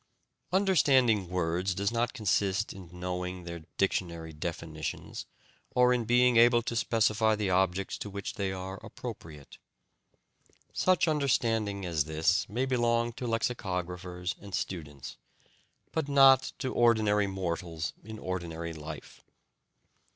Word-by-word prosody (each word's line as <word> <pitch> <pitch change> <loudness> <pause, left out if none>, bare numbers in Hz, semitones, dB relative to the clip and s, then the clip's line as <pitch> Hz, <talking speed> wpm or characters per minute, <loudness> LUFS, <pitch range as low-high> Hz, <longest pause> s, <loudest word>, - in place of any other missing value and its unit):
Understanding 135 - +3
words 90 +1 -1
does 100 +2 0
not 120 0 0
consist 105 -3 0
in 95 -3 -11
knowing 90 0 -4
their 85 -2 -8
dictionary 85 -4 -1
definitions, 80 -1 -5 0.5
or 125 0 +5
in 120 -2 0
being 120 +1 +4
able 120 0 +6
to 120 - -3
specify 110 -1 +2
the 105 -3 -1
objects 95 +1 +1
to 105 - -5
which 100 -1 -5
they 100 -4 -2
are 95 +1 -5
appropriate. 75 -3 -9 1.1
Such 185 -2 +3
understanding 115 -9 +1
as 80 -4 0
this 80 +3 +1
may 120 +6 0
belong 120 -2 +1
to 125 - -5
lexicographers 90 -6 -2
and 100 -2 -5
students, 75 -9 -5 0.7
but 155 -3 -2
not 135 -2 +6
to 130 -2 -3
ordinary 110 -3 +3
mortals 85 -4 -3
in 110 +1 -8
ordinary 85 -4 -4
life. 75 -1 -9
100 Hz, 120 wpm, -30 LUFS, 90-120 Hz, 1.1 s, able